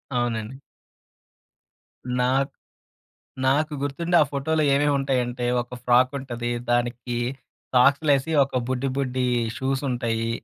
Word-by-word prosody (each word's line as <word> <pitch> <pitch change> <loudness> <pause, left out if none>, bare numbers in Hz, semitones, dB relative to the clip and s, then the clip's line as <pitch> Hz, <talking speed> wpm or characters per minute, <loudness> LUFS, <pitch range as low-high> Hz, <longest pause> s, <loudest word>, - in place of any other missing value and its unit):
అవునండి. 120 0 -2 1.6
నాక్ 135 +3 +1 0.9
నాకు 145 +3 +2
గుర్తుండి 165 +5 -1
ఆ - - +7
ఫోటోలో 155 +3 0
ఏమేమి 145 +1 +3
ఉంటాయంటే 125 -2 -1 0.2
ఒక 120 +1 -9
ఫ్రాక్ 125 +1 +4
ఉంటది. 120 -2 -4 0.2
దానికి 120 0 -1 0.6
సాక్స్‌లు 140 +4 +4
వేసి 140 +4 0
ఒక 130 -1 -2
బుడ్డి 130 +1 -1
బుడ్డి 130 -2 -1 0.3
షూస్ 135 +1 -1
ఉంటాయి. 115 -2 -1
130 Hz, 110 wpm, -24 LUFS, 120-140 Hz, 1.6 s, ఆ